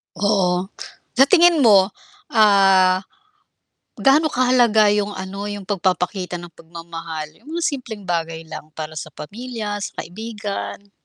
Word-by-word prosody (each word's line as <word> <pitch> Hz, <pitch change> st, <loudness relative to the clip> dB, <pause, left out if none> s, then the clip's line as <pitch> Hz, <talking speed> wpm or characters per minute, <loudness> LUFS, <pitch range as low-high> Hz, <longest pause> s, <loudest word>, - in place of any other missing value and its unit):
Oo. 190 Hz, -1 st, +1 dB, 0.5 s
Sa 270 Hz, -, +7 dB
tingin 345 Hz, 0 st, +5 dB
mo, 205 Hz, -7 st, +5 dB, 0.4 s
ah, 195 Hz, -4 st, +5 dB, 1.0 s
gaano 300 Hz, +3 st, +4 dB
kahalaga 245 Hz, -4 st, +4 dB
yung 205 Hz, 0 st, 0 dB
ano, 195 Hz, +1 st, -6 dB
yung 205 Hz, -2 st, -7 dB
pag-papakita 185 Hz, -2 st, -1 dB
ng 170 Hz, -2 st, -11 dB
pag-mamahal 165 Hz, 0 st, -8 dB
yung 295 Hz, -, -13 dB
mga 345 Hz, -, -3 dB
simpleng 230 Hz, -8 st, -5 dB
bagay 165 Hz, -1 st, -3 dB
lang 155 Hz, -1 st, -9 dB
para 155 Hz, 0 st, -7 dB
sa 155 Hz, 0 st, -7 dB
pamilya, 210 Hz, -, -6 dB
sa -, -, -6 dB
kaibigan? 205 Hz, 0 st, -6 dB
200 Hz, 125 wpm, -21 LUFS, 175-220 Hz, 1.0 s, Sa